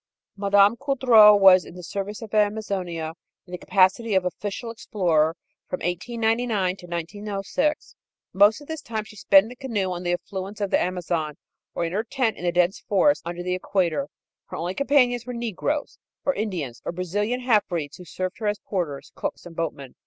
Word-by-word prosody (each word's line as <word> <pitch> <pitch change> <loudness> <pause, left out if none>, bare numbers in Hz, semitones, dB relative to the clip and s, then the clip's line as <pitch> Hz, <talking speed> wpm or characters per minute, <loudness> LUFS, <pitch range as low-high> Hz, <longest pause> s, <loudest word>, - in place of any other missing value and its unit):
Mme. 200 +2 +4
Coudreau 245 -7 +7
was 190 -2 +7
in - - -12
the 180 - -9
service 200 +4 -5
of 220 - -10
Amazonia, 195 -6 -1 0.3
in 180 - -16
the 180 - -4
capacity 195 +3 +2
of 190 -1 +2
official 205 +6 -4
explorer, 165 -8 +1 0.3
from 180 - -3
1899 220 +1 0
to 175 - -12
1906. 200 - -3 0.4
Most 205 +7 +5
of 290 - -13
this 320 -1 -5
time 220 -2 -4
she 215 0 -14
spent 195 -1 +5
in 225 - -10
a - - -9
canoe 225 -8 -2
on 175 -1 -4
the 175 -1 -1
affluents 195 +3 -5
of 200 -2 -2
the - - +3
Amazon, 170 -4 -2 0.4
or 170 - 0
in 165 - -4
her 210 +3 0
tent 245 -1 -1
in 180 - -7
the 175 - +2
dense 180 +2 +2
forests 250 +9 +2
under 175 +1 -4
the 180 0 -1
equator. 175 -6 0 0.4
Her - - -8
only 175 +3 -3
companions 250 -2 +2
were 250 - -4
negroes, 235 - -3 0.3
or 280 - +3
Indians, 175 - -4
or - - -3
Brazilian 205 +8 -2
halfbreeds 185 - 0
who 180 - -11
served 185 +3 -5
her 215 - -2
as 205 0 0
porters, 170 -11 -4
cooks - - -5
and 170 -1 -11
boatmen. 145 -6 -4
195 Hz, 185 wpm, -24 LUFS, 175-220 Hz, 0.4 s, Coudreau